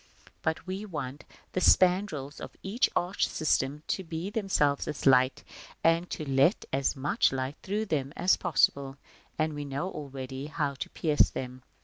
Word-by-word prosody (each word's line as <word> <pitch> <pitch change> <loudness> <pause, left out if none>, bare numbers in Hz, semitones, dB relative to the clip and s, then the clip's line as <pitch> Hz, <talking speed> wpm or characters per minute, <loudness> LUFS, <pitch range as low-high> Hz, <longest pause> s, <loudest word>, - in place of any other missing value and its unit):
But 160 +1 -1
we 190 +2 -4
want 150 -8 -6 0.3
the 185 - -1
spandrils 180 -8 +3
of - - -9
this 220 +7 +1
arch 180 +3 +1
system 150 -1 0
to 190 - -1
be 165 +3 -5
themselves 190 - +1
as 150 - -4
light, 130 -1 +4 0.4
and 165 +2 +3
to 155 - -5
let 135 +8 +3
as 135 +2 +1
much 145 - +2
light 130 +1 -3
through 210 +3 -2
them, 140 -8 -1
as 185 - +4
possible: 140 -5 +1 0.4
and 155 0 0
we 145 0 -4
know 140 +6 -3
already 135 -1 -6
how 150 -2 -1
to 135 - -6
pierce 150 -3 +3
them 125 0 -6
(Chap. 130 - -33
150 Hz, 165 wpm, -29 LUFS, 135-180 Hz, 0.4 s, light